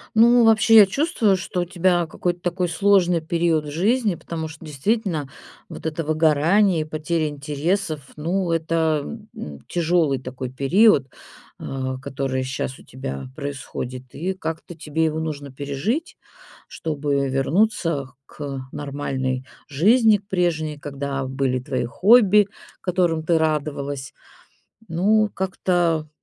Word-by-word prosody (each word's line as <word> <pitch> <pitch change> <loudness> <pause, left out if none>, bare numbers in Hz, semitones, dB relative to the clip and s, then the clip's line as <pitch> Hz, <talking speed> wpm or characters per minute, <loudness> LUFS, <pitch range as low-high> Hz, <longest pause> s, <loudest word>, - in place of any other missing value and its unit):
Ну, 235 +1 +6
вообще, 225 0 +5
я 205 -2 +10
чувствую, 225 - +1
что 180 0 -3
у - - 0
тебя 175 -1 +1
какой-то 175 +2 -3
такой 175 0 -1
сложный 180 -1 +3
период 160 -1 0
в - - -5
жизни, 210 - +1
потому 160 -1 -5
что 160 +1 -12
действительно, 155 - -1 0.4
вот - - -8
это 160 +1 -2
выгорание, 160 +4 +3
и - - -3
потеря 155 0 -1
интересов, 150 +4 -2 0.2
ну, 175 +3 -1
это, 160 +3 0 0.2
э, 70 -2 -7
тяжёлый 165 -5 +1
такой 130 0 -6
период, 140 - +4 0.5
а, 130 -1 -4
который 130 0 -3
щас 130 0 -4
у - - -15
тебя 135 0 -6
происходит. 130 -3 -6
И 185 +5 -2
как-то 165 -1 -6
тебе 160 +1 -1
его 155 0 0
нужно 145 -3 -4
пережить, 145 - -3 0.5
чтобы 145 -3 -1
вернуться 145 -1 0
к 140 -3 -6
нормальной 135 -3 -3 0.2
жизни, 215 - +4
к 200 +1 -24
прежней, 160 -5 0
когда 140 -1 -4
были 130 -1 -1
твои 130 -2 -2
хобби, 205 - +5 0.3
которым 175 -3 0
ты 165 0 +3
радовалась. 145 -3 -2 0.7
Ну, 210 +6 +3
как-то, 175 -4 0
160 Hz, 130 wpm, -22 LUFS, 140-185 Hz, 0.7 s, я